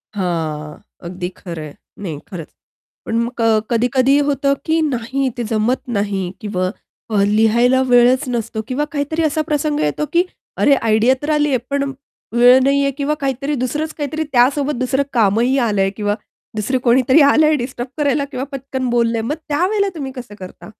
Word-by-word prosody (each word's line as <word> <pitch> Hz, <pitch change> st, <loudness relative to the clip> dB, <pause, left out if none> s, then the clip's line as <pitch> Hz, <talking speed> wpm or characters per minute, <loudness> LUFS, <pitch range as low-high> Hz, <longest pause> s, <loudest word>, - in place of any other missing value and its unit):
हां. 160 Hz, -5 st, -3 dB, 0.3 s
अगदी 180 Hz, 0 st, -5 dB
खरं 170 Hz, -3 st, -7 dB
आहे. 150 Hz, -2 st, -9 dB, 0.2 s
नाही 165 Hz, -8 st, -5 dB
खरच. 170 Hz, -5 st, -7 dB, 0.6 s
पण 225 Hz, -, -2 dB
मग 235 Hz, +1 st, -2 dB
अ, 225 Hz, -1 st, +4 dB
कधी-कधी 250 Hz, +3 st, +2 dB
होतं, 280 Hz, 0 st, +1 dB
की 320 Hz, +1 st, +2 dB
नाही 260 Hz, +2 st, -1 dB
ते 240 Hz, -, -2 dB
जमत 230 Hz, +4 st, +1 dB, 0.2 s
नाही 200 Hz, -1 st, -1 dB, 0.2 s
किंवा 185 Hz, -3 st, -1 dB, 0.4 s
अ, 205 Hz, -2 st, +2 dB
लिहायला 225 Hz, +5 st, +3 dB
वेळच 245 Hz, +2 st, +5 dB
नसतो 230 Hz, -2 st, -3 dB
किंवा 275 Hz, +4 st, -1 dB
काहीतरी 305 Hz, +2 st, -2 dB
असा 310 Hz, 0 st, +1 dB
प्रसंग 300 Hz, -1 st, 0 dB
येतो, 150 Hz, -, 0 dB
की 345 Hz, +1 st, +4 dB, 0.3 s
अरे 285 Hz, -, +4 dB
आयडियातर 245 Hz, +5 st, +1 dB
आली 295 Hz, 0 st, +2 dB
आहे. 265 Hz, -, +2 dB
पण 280 Hz, 0 st, -1 dB, 0.4 s
वेळ 245 Hz, +2 st, +7 dB
नाही 280 Hz, +1 st, +3 dB
आहे 275 Hz, -, +1 dB
किंवा 290 Hz, +1 st, 0 dB
काहीतरी 275 Hz, +2 st, -1 dB
दुसरंच, 305 Hz, +5 st, -2 dB
काहीतरी 310 Hz, +1 st, -3 dB
त्यासोबत. 275 Hz, +4 st, +3 dB
दुसरं 265 Hz, +2 st, +1 dB
कामही 230 Hz, +3 st, +2 dB
आलं 205 Hz, -3 st, +1 dB
आहे 195 Hz, -, +2 dB
किंवा 205 Hz, -1 st, 0 dB, 0.4 s
दुसर 215 Hz, +5 st, 0 dB
कोणीतरी 260 Hz, +4 st, +4 dB
आलं 295 Hz, +2 st, +5 dB
आहे 310 Hz, -, +3 dB
डिस्टर्ब 245 Hz, -1 st, -4 dB
करायला 285 Hz, -1 st, +1 dB
किंवा 255 Hz, -, -3 dB
पटकन 265 Hz, -1 st, -4 dB
बोललं 235 Hz, -1 st, +1 dB
आहे. 225 Hz, -, -1 dB
मग 295 Hz, -, -1 dB
त्यावेळेला 390 Hz, +7 st, +1 dB
तुम्ही 275 Hz, -4 st, -5 dB
कसं 245 Hz, -4 st, -9 dB
करता? 185 Hz, +2 st, -10 dB
255 Hz, 175 wpm, -18 LUFS, 220-280 Hz, 0.6 s, वेळ